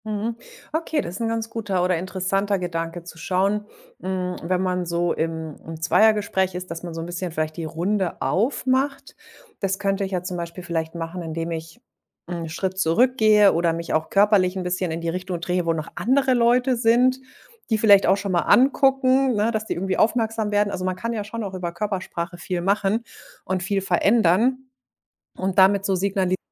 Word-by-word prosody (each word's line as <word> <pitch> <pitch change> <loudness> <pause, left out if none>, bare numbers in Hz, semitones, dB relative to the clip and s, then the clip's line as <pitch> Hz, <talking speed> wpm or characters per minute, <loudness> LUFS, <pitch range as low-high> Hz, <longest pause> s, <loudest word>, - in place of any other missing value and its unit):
Mhm, 215 +2 -2 0.4
okay, 320 -1 0
das 175 - -6
ist 205 - -6
'n 230 - 0
ganz 225 0 -2
guter 200 -5 -1
oder 180 -1 +2
interessanter 195 +2 -1
Gedanke 165 -1 -4
zu 170 -1 -11
schauen, 200 +4 0 0.3
hm, 185 -1 -2
wenn 180 +2 0
man 180 -1 -1
so 170 0 0
im 160 -1 -3
im 160 0 -8
Zweiergespräch 190 +1 +2
ist, 180 -1 -6
dass 165 0 -5
man 170 -2 -7
so 165 - -4
'n - - -5
bisschen 175 +1 -4
vielleicht 155 -1 -2
die 165 - -4
Runde 180 +4 -1
aufmacht. 260 +5 0 0.4
Das 195 -1 -1
könnte 195 0 -1
ich 195 - -3
ja 180 -2 -2
zum 180 0 -4
Beispiel 170 +1 -6
vielleicht 165 -1 -3
machen, 170 +2 -5
indem 165 0 -4
ich 165 +7 -7 0.5
'n 170 -2 -5
Schritt 185 +4 -3
zurückgehe, 215 +2 +4
oder 170 0 +1
mich 170 0 -4
auch 160 0 0
körperlich 200 -2 +3
'n 185 - -2
bisschen 180 0 -1
in 160 +1 -4
die 165 - -2
Richtung 180 0 -4
drehe, 175 0 -1
wo 165 - +3
noch 155 -1 -5
andere 265 +2 +2
Leute 245 +1 +3
sind, 245 +3 +3 0.5
die 220 - +2
vielleicht 205 -2 +6
auch 195 - +4
schon 200 -1 -3
mal 175 - +2
angucken, 265 -1 +4
ne, 210 +2 +1
dass 220 -1 -2
die - - -2
irgendwie 190 +2 -2
aufmerksam 225 -1 +1
werden. 205 0 +1
Also, 185 - -4
man 185 0 -1
kann 230 +5 -3
ja 215 -2 -3
schon 225 +2 -6
auch 195 -2 -5
über 180 -2 -4
Körpersprache 185 -2 -4
viel 180 +1 -3
machen 200 +4 +1 0.4
und 185 0 -1
viel 195 +2 -1
verändern 215 +6 +2 0.7
und 190 0 -3
damit 195 +1 +5
so 195 - +1
signalisieren: 185 -1 0
190 Hz, 195 wpm, -23 LUFS, 175-215 Hz, 0.7 s, vielleicht